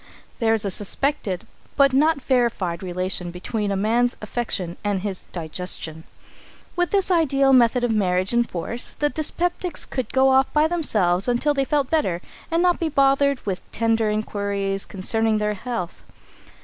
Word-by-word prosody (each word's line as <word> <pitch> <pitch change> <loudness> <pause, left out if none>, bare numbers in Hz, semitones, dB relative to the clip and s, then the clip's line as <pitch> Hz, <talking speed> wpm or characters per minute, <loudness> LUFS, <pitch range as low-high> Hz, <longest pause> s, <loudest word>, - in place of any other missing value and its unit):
There 225 -2 +3
is 215 - -1
a 200 - -1
suspected 205 -1 -2 0.3
but 275 -1 +4
not 305 +3 +3
verified 230 -10 0
relation 185 -1 -3
between 200 +4 -3
a - - 0
man's 230 +5 +1
affection 210 -6 -3
and 205 -2 -1
his 195 -2 -5
digestion. 160 -1 -4 0.7
With 355 -1 +1
this 390 -2 +2
ideal 275 -5 +3
method 245 0 +4
of 245 - +1
marriage 185 -2 +1
in 240 0 +4
force, 230 +3 -4
the 295 - 0
dyspeptics 350 +2 -1
could 255 -4 -4
go 265 0 +4
off 265 0 +3
by 300 0 +4
themselves 210 - +1
until 245 +5 +2
they 275 -1 0
felt 285 -2 0
better, 285 - +1 0.3
and 330 +1 +1
not 355 -1 +3
be 330 - 0
bothered 275 -1 +2
with 190 -2 -2
tender 225 -1 +1
inquiries 200 -2 -2
concerning 220 +3 +1
their 210 0 0
health. 210 -4 -5
225 Hz, 160 wpm, -23 LUFS, 195-275 Hz, 0.7 s, but